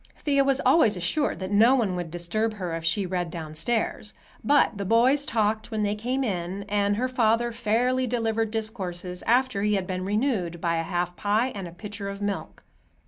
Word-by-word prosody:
Thea 280 -2 +2
was 275 0 +2
always 220 - +5
assured 180 - 0
that 190 +1 -5
no 225 +6 +6
one 215 -8 0
would 175 -2 -4
disturb 195 +7 -1
her 180 -5 -4
if 165 - -5
she 180 +4 +1
read 180 -1 -2
downstairs, 170 +7 -3 0.3
but 285 0 +3
the - - -1
boys 245 +8 +3
talked 215 0 0
when 215 -2 -1
they 205 0 +1
came 250 +6 -2
in, 190 -3 -3
and 205 0 +1
her 250 +4 0
father 235 -1 +2
fairly 245 +3 +1
delivered 225 -2 0
discourses 190 -5 -4
after 250 -3 +2
he 210 0 +2
had 190 -2 -1
been 185 0 -3
renewed 200 -5 -1
by 170 0 0
half 175 +2 -1
a - - -27
pie 210 +6 +1
and 195 -3 -6
a - - -9
pitcher 200 +2 -7
of 200 0 -6
milk. 205 -1 -4
210 Hz, 195 wpm, -26 LUFS, 180-235 Hz, 0.3 s, no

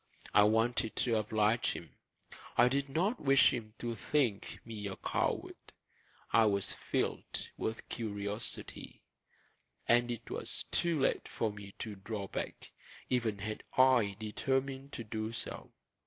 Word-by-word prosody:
I 105 - +8
wanted 115 +1 +2
to 120 -2 +2
oblige 110 +1 +2
him; - - -8 0.7
I 120 +1 +7
did 140 +1 0
not 190 - +1
wish 135 -1 +6
him 110 -3 -5
to 120 -1 -3
think 115 -2 0
me 110 -3 -5
a 95 - -4
coward; - - -1 0.8
I 115 -1 +7
was 100 -2 +1
filled - - -2
with 110 +1 -3
curiosity; 105 -1 -3 0.8
and 120 +1 +4
it 120 -1 -4
was - - -2
too 170 -3 +1
late 135 - +1
for 110 - -1
me 100 -1 -10
to 110 - -5
draw 100 0 -4
back, - - -5 0.4
even 115 -5 +1
had 105 +2 -4 0.2
I 125 -6 +5
determined 135 +5 -1
to 115 - -4
do 110 0 -3
so. 115 - -6
115 Hz, 140 wpm, -33 LUFS, 105-130 Hz, 0.8 s, I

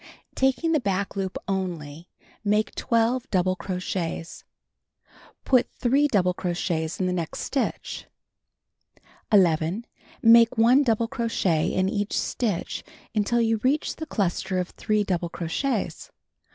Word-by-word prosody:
Taking 265 +5 +1
the 310 - +3
back 200 -4 -2
loop 190 -1 -3
only, 175 -5 -4 0.3
make 210 +1 +1
12 235 +2 0
double 185 -1 +1
crochets. 180 -3 -4 1.0
Put 255 -2 +3
3 275 +4 +3
double 185 -8 +2
crochets 175 -3 -2
in 185 - +1
the 180 - 0
next 170 -3 -3
stitch. 275 - -3 1.2
11. 180 +1 +3 0.4
Make 230 +1 +7
1 240 +5 +6
double 230 -4 +1
crochet 225 -10 0
in 185 0 +1
each 205 +1 -1
stitch 210 -8 -2 0.3
until 225 +2 +1
you 225 -1 +2
reach 260 +7 0
the 315 - -6
cluster 190 -3 -1
of 180 -1 -1
3 215 -1 0
double 175 -3 -1
crochets. 205 - -3
200 Hz, 125 wpm, -25 LUFS, 180-235 Hz, 1.2 s, Make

